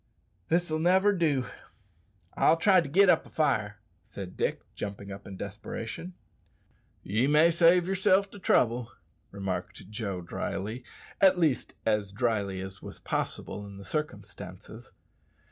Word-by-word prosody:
"This'll 165 -2 +1
never 190 +5 +4
do. 150 -8 +1 0.9
I'll 165 - +4
try 185 +2 +5
to 145 - -6
git 195 +7 +5
up 180 - +4
a - - -15
fire," 110 -9 0 0.3
said 95 -1 -9
Dick, - - -1
jumping 100 0 -6
up 100 +1 -9
in 95 -1 -8
desperation. 115 - -6 0.9
"Ye 110 +7 +1
may 155 +3 +5
save 170 +1 +5
yerself 190 +1 +2
the 205 - -11
trouble," 120 -8 +2 0.4
remarked 95 0 -5
Joe 100 -5 -3
dryly 100 +7 -4 0.4
at 190 -1 +6
least 155 -7 +1
as 105 -3 +1
dryly 100 -4 -1
as 95 0 -8
was - - -9
possible 105 - -3
in 100 -1 -10
the 100 - -10
circumstances. 150 -10 -6
120 Hz, 135 wpm, -29 LUFS, -, 0.9 s, at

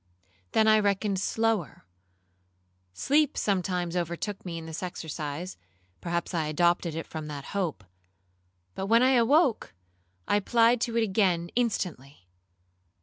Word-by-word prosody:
Then 220 - +4
I 215 0 +6
reckoned 200 -1 0
slower. 220 - -1 1.1
Sleep 290 - +1
sometimes 180 -3 -1
overtook 175 +4 -3
me 170 -3 -5
in 165 - -7
this 160 0 -6
exercise, 165 -1 -5 0.4
(perhaps 170 +1 -3
I 160 -3 0
adopted 170 +1 +1
it 165 - -4
from 155 -1 -7
that 145 -2 -7
hope); 180 - -2 0.9
but 195 - -4
when 230 +3 +5
I 260 - +5
awoke, 255 - +3 0.5
I 205 - +3
applied 230 +3 +3
to 235 -1 -1
it 230 - +3
again 190 -5 +1
instantly. 165 - -2
185 Hz, 130 wpm, -27 LUFS, 165-225 Hz, 1.1 s, I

